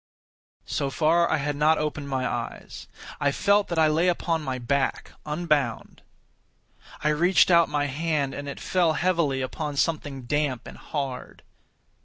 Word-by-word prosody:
So 140 - -2
far, 165 +4 +2
I - - +2
had 145 0 -2
not 155 +2 +3
opened 150 -2 -3
my 130 -1 -1
eyes. - - -6 0.3
I 140 -1 +2
felt 200 +7 +2
that 170 - -3
I 160 - +5
lay 155 +3 +2
upon 170 -2 0
my 130 -3 -3
back, 135 +3 -1 0.2
unbound. 150 -7 -1 1.0
I 150 - +3
reached 175 +5 +4
out 170 -1 +5
my 145 -1 0
hand, 145 -1 -1
and 145 0 -6
it 140 - -7
fell 175 -4 +1
heavily 160 -5 +1
upon 145 +2 -4
something 145 -4 -1
damp 140 -1 -1
and - - -11
hard. 135 -4 -5
150 Hz, 155 wpm, -25 LUFS, 140-165 Hz, 1.0 s, I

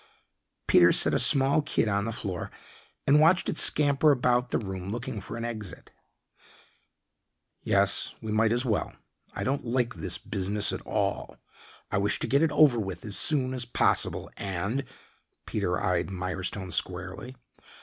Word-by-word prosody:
Peter 90 0 +5
set - - +3
a - - +2
small 140 +2 +3
kid 145 - -1
on 100 0 0
the 115 - -3
floor 95 -5 -4 0.6
and 145 +2 +5
watched 175 +4 +4
it - - -1
scamper 145 0 +4
about 125 -2 +1
the - - 0
room, 95 -3 -6
looking 120 0 -5
for 105 - -7
an 115 - -4
exit. 110 -5 -7 1.7
"Yes, - - +2
we 110 - -6
might 110 +1 +2
as 120 +2 0
well. 110 -4 -1 0.4
I - - -3
don't 140 +2 -1
like 125 0 -1
this 90 -3 -3
business 100 +1 -1
at - - -5
all. - - -2 0.5
I - - +1
wish 100 +1 +1
to - - -3
get 140 +2 +2
it 165 -2 +2
over 145 -5 +4
with 95 -4 -5
as 105 -2 0
soon 130 -4 +2
as 125 -1 -1
possible, 120 - 0
and 100 +8 -3 0.3
" - - -45
Peter 95 -4 -2
eyed 90 -1 0
Mirestone 95 +1 -4
squarely. 95 +9 -3
110 Hz, 160 wpm, -27 LUFS, 95-130 Hz, 1.7 s, Peter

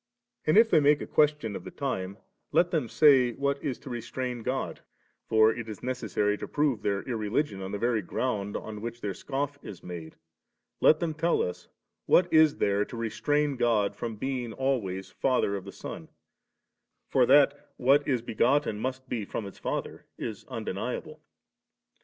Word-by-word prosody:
And 155 - +5
if 225 0 +6
they - - +6
make 145 0 +4
a - - -5
question 150 -8 +1
of - - -6
the - - -7
time, 100 -8 -3 0.3
let 175 0 +3
them 150 -9 0
say 130 -5 +5
what 140 +2 -1
is 135 -4 -2
to 140 - -9
restrain 120 +1 -4
God—for 110 -3 -1
it 115 -1 -6
is 105 - -8
necessary 110 -5 -1
to - - -5
prove 145 -7 0
their 100 -1 -1
irreligion 110 -1 -1
on 95 0 -5
the 100 - -2
very 115 0 +1
ground 105 -6 -2
on 105 -1 -7
which 120 +1 -5
their 100 -2 -2
scoff 140 +3 -3
is 95 - -10
made 85 -3 -8 0.3
— - - -51
^let 155 - +6
them 165 -1 -2
tell 165 +2 +1
us, 90 - -5 0.4
what 175 -1 +4
is 155 -2 +6
there 100 0 +2
to 115 - -8
restrain 145 +5 0
God 115 -4 +2
from 115 -2 -4
being 125 0 -3
always 110 -9 -2
Father 125 -6 +1
of 100 -1 -6
the 100 - -7
Son; - - -8 1.0
for - - +3
that - - +4
what 135 +3 +3
is 125 -5 +1
begotten 120 0 +1
must 130 +2 -4
be 120 -3 -2
from 105 +2 -5
its 100 - -10
father - - -4
is - - -6
undeniable. - - -5
120 Hz, 175 wpm, -28 LUFS, 105-140 Hz, 1.0 s, if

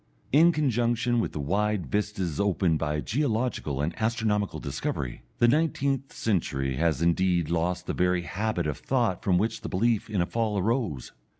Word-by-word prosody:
In 165 +5 +6
conjunction 120 -5 +1
with - - -1
the - - -5
wide 100 +5 0
vistas 100 - -2
opened 95 -5 +2
by 75 -1 -1
geological 115 - -1
and 80 +3 -1
astronomical 110 -3 0
discovery, - - -4 0.2
the 120 - +4
nineteenth 140 -1 +1
century 70 - -1
has 80 -1 +1
indeed 85 -1 +2
lost 85 +1 0
the - - -2
very 90 -1 +1
habit 95 -1 -2
of 75 -2 -3
thought 120 -8 0
from 90 -3 +3
which 110 +4 -1
the - - -5
belief 110 +3 +1
in 105 -3 -1
a 85 - +2
Fall 105 +3 -1
arose. 100 - -1
100 Hz, 165 wpm, -27 LUFS, 85-115 Hz, 0.2 s, In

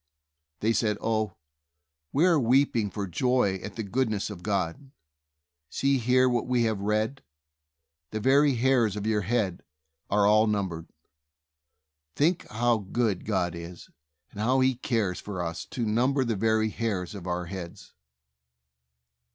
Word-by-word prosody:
They 110 +2 +2
said, 105 -2 +1
"Oh, 110 -1 -1 0.8
we 155 +5 +3
are 170 -4 +4
weeping 120 -3 +2
for 100 +1 -4
joy 105 +1 +1
at 100 - -7
the 115 - -3
goodness 110 -1 -1
of 90 -4 -9
God! 95 +6 -2 0.8
See 135 -1 +1
here 125 +2 +3
what 120 -1 0
we 125 -2 +2
have 110 -3 0
read: 110 +6 -1 0.9
'The 110 - -4
very 135 +4 +4
hairs 120 -4 +2
of 105 0 -4
your 110 -1 +1
head 100 -3 -1 0.5
are 105 0 +3
all 110 +2 +5
numbered.' 95 -6 -2 1.3
Think 165 +4 +1
how 120 0 +1
good 105 -1 -1
God 95 -5 0
is, 85 +1 -9 0.4
and 105 - -10
how 125 +5 +2
He 130 0 +3
cares 115 -7 -1
for 100 -3 -6
us 85 -1 -4
to 120 - -3
number 125 +5 +2
the 115 -2 0
very 110 +1 +2
hairs 105 -6 -3
of 95 -3 -8
our 90 0 -2
heads." 90 -1 -8
110 Hz, 145 wpm, -27 LUFS, 100-125 Hz, 1.3 s, all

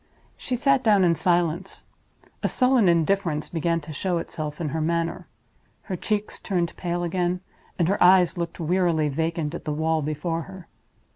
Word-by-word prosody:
She 255 - -3
sat 275 +1 +2
down 205 -4 +4
in 170 -2 +4
silence. 170 0 0 0.6
A - - +1
sullen 250 -6 +3
indifference 170 -2 +1
began 165 0 0
to 155 +1 -9
show 180 +4 -1
itself 155 -2 -5
in 160 -3 -2
her 160 +3 -2
manner; 165 +1 -1 0.6
her 190 - -4
cheeks 210 +3 -3
turned 175 -4 -2
pale 175 -1 -2
again; 180 +1 -1 0.4
and 170 - +2
her 195 - 0
eyes 180 -1 +5
looked 170 -1 -4
wearily 165 -2 +1
vacant 160 +1 -2
at - - -6
the 150 - -2
wall 160 +1 0
before 155 +3 -2
her. 190 -3 -11
170 Hz, 165 wpm, -24 LUFS, 160-185 Hz, 0.6 s, eyes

